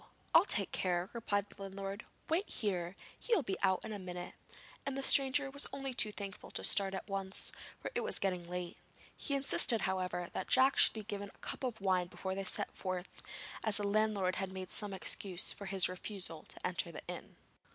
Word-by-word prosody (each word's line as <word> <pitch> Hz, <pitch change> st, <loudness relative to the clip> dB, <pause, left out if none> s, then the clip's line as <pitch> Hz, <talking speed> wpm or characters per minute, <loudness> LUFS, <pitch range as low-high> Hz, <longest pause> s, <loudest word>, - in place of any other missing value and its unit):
I'll 335 Hz, -, +8 dB
take 200 Hz, -, +1 dB
care,' 180 Hz, -1 st, 0 dB
replied 205 Hz, -4 st, 0 dB
the -, -, -14 dB
landlord. 195 Hz, +1 st, -5 dB, 0.2 s
'Wait 345 Hz, +6 st, +1 dB
here! 185 Hz, -4 st, -1 dB, 0.2 s
he 475 Hz, -, +2 dB
will 330 Hz, -, +2 dB
be 195 Hz, -5 st, -3 dB
out 190 Hz, -1 st, +2 dB
in 220 Hz, -, -4 dB
a 205 Hz, -, -4 dB
minute,' 180 Hz, -1 st, -6 dB, 0.5 s
and 275 Hz, -1 st, -2 dB
the 275 Hz, -, -1 dB
stranger 275 Hz, 0 st, +5 dB
was 280 Hz, +1 st, +1 dB
only 270 Hz, -1 st, -4 dB
too 215 Hz, -3 st, +3 dB
thankful 200 Hz, -2 st, -6 dB
to -, -, -2 dB
start 195 Hz, -1 st, +3 dB
at -, -, -5 dB
once, 195 Hz, -1 st, -2 dB, 0.3 s
for -, -, -5 dB
it -, -, +1 dB
was -, -, 0 dB
getting 180 Hz, -3 st, -1 dB
late. 180 Hz, -1 st, -4 dB, 0.4 s
He 280 Hz, -, -2 dB
insisted, 270 Hz, -4 st, +4 dB
however, 185 Hz, -2 st, -1 dB
that -, -, -3 dB
Jack 265 Hz, +1 st, +5 dB
should -, -, +7 dB
be 220 Hz, -, -5 dB
given 200 Hz, 0 st, -4 dB
a -, -, -24 dB
cup -, -, -6 dB
of 240 Hz, -4 st, -2 dB
wine 185 Hz, -2 st, +2 dB
before 190 Hz, +1 st, -4 dB
they 195 Hz, +1 st, -2 dB
set -, -, +1 dB
forth, 185 Hz, -1 st, -4 dB, 0.4 s
as 215 Hz, -2 st, +2 dB
the 205 Hz, -, 0 dB
landlord 205 Hz, -3 st, +2 dB
had 195 Hz, -1 st, -2 dB
made 185 Hz, -1 st, -6 dB
some 210 Hz, -2 st, +3 dB
excuse 190 Hz, 0 st, 0 dB
for 200 Hz, -, -7 dB
his 195 Hz, -1 st, +6 dB
refusal 185 Hz, -3 st, -4 dB
to -, -, -7 dB
enter 180 Hz, -1 st, -1 dB
the 155 Hz, -, -8 dB
inn. -, -, -7 dB
195 Hz, 205 wpm, -35 LUFS, 185-220 Hz, 0.5 s, I'll